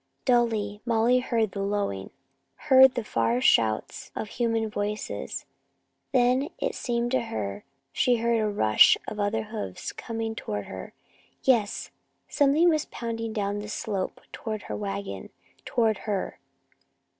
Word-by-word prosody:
Dully, 225 Hz, -5 st, +1 dB
Molly 235 Hz, +1 st, +3 dB
heard 230 Hz, -4 st, 0 dB
the 200 Hz, -, -4 dB
lowing, 195 Hz, -, -2 dB, 0.5 s
heard 265 Hz, -, +6 dB
the 240 Hz, -, -1 dB
far 115 Hz, -, +1 dB
shouts 110 Hz, -3 st, +2 dB
of 215 Hz, -, -4 dB
human 230 Hz, -2 st, 0 dB
voices. 210 Hz, 0 st, -4 dB, 0.7 s
Then, 255 Hz, +2 st, +3 dB
it -, -, -1 dB
seemed 240 Hz, -1 st, -1 dB
to 260 Hz, -, +2 dB
her, 105 Hz, -, -4 dB, 0.3 s
she 250 Hz, -, +3 dB
heard 235 Hz, 0 st, +1 dB
a 215 Hz, -1 st, +1 dB
rush 110 Hz, -, +6 dB
of 210 Hz, -, -5 dB
other 210 Hz, +2 st, 0 dB
hoofs 215 Hz, -, -5 dB
coming 225 Hz, -1 st, -4 dB
toward 105 Hz, -, -4 dB
her. 95 Hz, -, -8 dB, 0.5 s
Yes, 230 Hz, -6 st, +1 dB, 0.4 s
something 290 Hz, +4 st, +4 dB
was 310 Hz, -3 st, +3 dB
pounding 230 Hz, -1 st, -4 dB
down 205 Hz, -1 st, -1 dB
the 210 Hz, 0 st, -6 dB
slope 210 Hz, -3 st, -3 dB
toward 215 Hz, -2 st, -5 dB
her -, -, -5 dB
wagon, 200 Hz, -1 st, -5 dB, 0.4 s
toward 225 Hz, -4 st, +1 dB
her. 200 Hz, -2 st, -2 dB
220 Hz, 135 wpm, -27 LUFS, 200-240 Hz, 0.7 s, heard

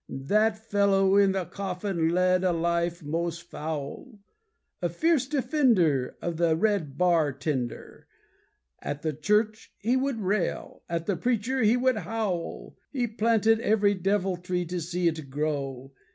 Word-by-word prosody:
That 210 Hz, +11 st, +1 dB
fellow 200 Hz, -3 st, +2 dB
in 200 Hz, -1 st, +5 dB
the 190 Hz, -2 st, -1 dB
coffin 180 Hz, -2 st, -2 dB
led 180 Hz, +1 st, +2 dB
a 185 Hz, -, +3 dB
life 170 Hz, +1 st, -1 dB
most 170 Hz, +3 st, -3 dB
foul. 160 Hz, -, -6 dB, 0.6 s
A 175 Hz, -, 0 dB
fierce 290 Hz, -, +1 dB
defender 240 Hz, -, +2 dB
of 170 Hz, -2 st, -2 dB
the 165 Hz, -1 st, +3 dB
red 170 Hz, -7 st, 0 dB
bar 170 Hz, -5 st, +3 dB
tender, 135 Hz, -3 st, -4 dB, 0.7 s
At 145 Hz, 0 st, -5 dB
the 155 Hz, -1 st, -1 dB
church 210 Hz, +8 st, 0 dB
he 235 Hz, +5 st, 0 dB
would 260 Hz, -2 st, 0 dB
rail, 195 Hz, -2 st, -2 dB
At 170 Hz, -1 st, -2 dB
the 200 Hz, -, 0 dB
preacher 250 Hz, +3 st, 0 dB
he 225 Hz, +2 st, +4 dB
would 255 Hz, -1 st, +2 dB
howl. 210 Hz, -6 st, -3 dB, 0.2 s
He 255 Hz, -4 st, 0 dB
planted 225 Hz, 0 st, +2 dB
every 210 Hz, -2 st, +3 dB
deviltry 185 Hz, -2 st, -1 dB
to 180 Hz, -1 st, -2 dB
see 175 Hz, +2 st, -1 dB
it 155 Hz, -4 st, -2 dB
grow. 135 Hz, -2 st, -3 dB
180 Hz, 140 wpm, -27 LUFS, 165-215 Hz, 0.7 s, in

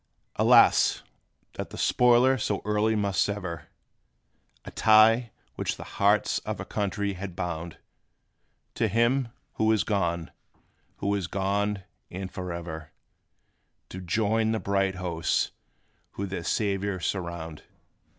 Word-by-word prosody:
Alas! -, -, +5 dB, 0.5 s
that -, -, -6 dB
the -, -, -9 dB
spoiler 125 Hz, +2 st, +4 dB
so 105 Hz, -5 st, -2 dB
early 105 Hz, +1 st, +1 dB
must 100 Hz, -2 st, 0 dB
sever 95 Hz, -6 st, -3 dB, 1.0 s
A -, -, -8 dB
tie, 110 Hz, +2 st, +5 dB, 0.3 s
which -, -, -2 dB
the -, -, -7 dB, 0.2 s
hearts -, -, +3 dB
of -, -, -5 dB
a -, -, -5 dB
country 100 Hz, 0 st, -2 dB
had 95 Hz, -1 st, -7 dB
bound 85 Hz, -2 st, -4 dB, 1.0 s
To 115 Hz, -, 0 dB
him, 120 Hz, +5 st, +2 dB, 0.3 s
who 110 Hz, 0 st, +3 dB
is 110 Hz, -, +2 dB
gone 85 Hz, -5 st, -1 dB, 0.6 s
who 100 Hz, 0 st, -1 dB
is 100 Hz, -4 st, -1 dB
gone, 100 Hz, +1 st, -1 dB, 0.3 s
and 95 Hz, +1 st, -6 dB
forever, 85 Hz, -3 st, -6 dB, 1.0 s
To 95 Hz, -, -7 dB
join 110 Hz, +4 st, +1 dB
the 110 Hz, -, -1 dB
bright 95 Hz, -2 st, 0 dB
hosts 90 Hz, -3 st, -1 dB, 0.6 s
who 100 Hz, -, -4 dB
their 95 Hz, -3 st, -5 dB
Saviour 100 Hz, 0 st, -1 dB
surround! 85 Hz, -3 st, -4 dB
100 Hz, 120 wpm, -27 LUFS, 90-110 Hz, 1.0 s, Alas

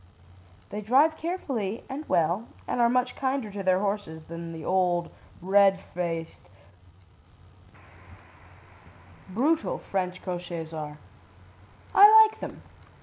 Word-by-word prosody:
They 210 Hz, +2 st, -4 dB
drive 275 Hz, +9 st, +4 dB
carefully 270 Hz, -, -4 dB
and 290 Hz, +3 st, -7 dB
well 175 Hz, +7 st, +1 dB, 0.2 s
and 245 Hz, -, -1 dB
are 235 Hz, -, +5 dB
much 250 Hz, +1 st, 0 dB
kinder 260 Hz, -5 st, -2 dB
to 200 Hz, 0 st, -5 dB
their 185 Hz, -1 st, +2 dB
horses 200 Hz, -6 st, -3 dB
than 165 Hz, +1 st, -8 dB
the 160 Hz, -2 st, -8 dB
old, 180 Hz, -2 st, +1 dB, 0.3 s
red 195 Hz, 0 st, +4 dB
faced, 165 Hz, -, -5 dB, 2.8 s
brutal 290 Hz, -, 0 dB
French 185 Hz, -1 st, -4 dB
cochérs 175 Hz, -3 st, -5 dB
are. 150 Hz, -1 st, -6 dB, 1.0 s
I 430 Hz, +2 st, +9 dB
like 435 Hz, -, -7 dB
them. -, -, -8 dB
195 Hz, 110 wpm, -27 LUFS, 175-255 Hz, 2.8 s, I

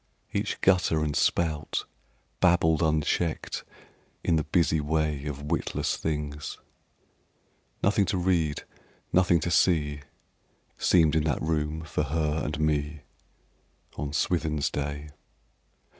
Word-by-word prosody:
Each -, -, -1 dB
gutter 90 Hz, -4 st, +3 dB
and 75 Hz, -1 st, -1 dB
spout 80 Hz, -3 st, 0 dB, 0.5 s
Babbled 85 Hz, -3 st, +4 dB
unchecked 80 Hz, +1 st, 0 dB, 0.6 s
in 85 Hz, -, +2 dB
the 80 Hz, -, +1 dB
busy 80 Hz, 0 st, +2 dB
way 75 Hz, -1 st, -1 dB
Of 70 Hz, -1 st, -5 dB
witless 85 Hz, -, 0 dB
things: 75 Hz, -1 st, -4 dB, 1.3 s
Nothing 100 Hz, 0 st, +3 dB
to 95 Hz, -, -1 dB
read, 85 Hz, -5 st, +1 dB, 0.5 s
nothing 90 Hz, -1 st, +4 dB
to 85 Hz, -, -1 dB
see 75 Hz, -5 st, +2 dB, 0.8 s
Seemed 80 Hz, -3 st, +4 dB
in 80 Hz, -1 st, +2 dB
that 75 Hz, -5 st, 0 dB
room 80 Hz, 0 st, -1 dB
for 75 Hz, -1 st, -2 dB
her 75 Hz, 0 st, 0 dB
and 75 Hz, +1 st, -3 dB
me 75 Hz, 0 st, 0 dB, 0.9 s
On 75 Hz, -, -3 dB
SwithinŌĆÖs 75 Hz, -1 st, 0 dB
day. 75 Hz, +1 st, -4 dB
80 Hz, 115 wpm, -27 LUFS, 75-85 Hz, 1.3 s, Babbled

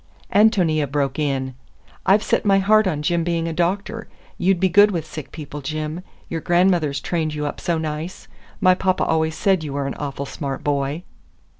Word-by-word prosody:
Ántonia 180 Hz, -, +3 dB
broke 145 Hz, 0 st, -1 dB
in. 135 Hz, -3 st, -1 dB, 0.5 s
"I've 205 Hz, +3 st, +5 dB
set -, -, +1 dB
my 195 Hz, -2 st, +4 dB
heart 210 Hz, +2 st, +4 dB
on 150 Hz, -5 st, -2 dB
Jim 170 Hz, +2 st, +1 dB
being 165 Hz, -1 st, -1 dB
a 165 Hz, -, -2 dB
doctor. 195 Hz, +7 st, -1 dB, 0.3 s
You'd 185 Hz, 0 st, +2 dB
be 190 Hz, -, +3 dB
good 205 Hz, +3 st, +6 dB
with 170 Hz, -6 st, -3 dB
sick 155 Hz, -2 st, -8 dB
people, 150 Hz, -2 st, -7 dB
Jim. 155 Hz, +4 st, -4 dB, 0.3 s
Your 165 Hz, -1 st, -4 dB
grandmother's 175 Hz, -5 st, +2 dB
trained 160 Hz, -3 st, -2 dB
you 150 Hz, 0 st, -2 dB
up 145 Hz, -, -5 dB
so 170 Hz, -2 st, 0 dB
nice. 160 Hz, +2 st, -5 dB, 0.3 s
My 185 Hz, -2 st, +5 dB
papa 185 Hz, 0 st, 0 dB
always 160 Hz, -1 st, +1 dB
said 190 Hz, -4 st, +1 dB
you 145 Hz, -3 st, -5 dB
were 140 Hz, 0 st, -2 dB
an 135 Hz, -, -3 dB
awful 140 Hz, -1 st, -4 dB
smart 135 Hz, -1 st, -5 dB
boy." 145 Hz, +3 st, -1 dB
160 Hz, 185 wpm, -21 LUFS, 150-185 Hz, 0.5 s, good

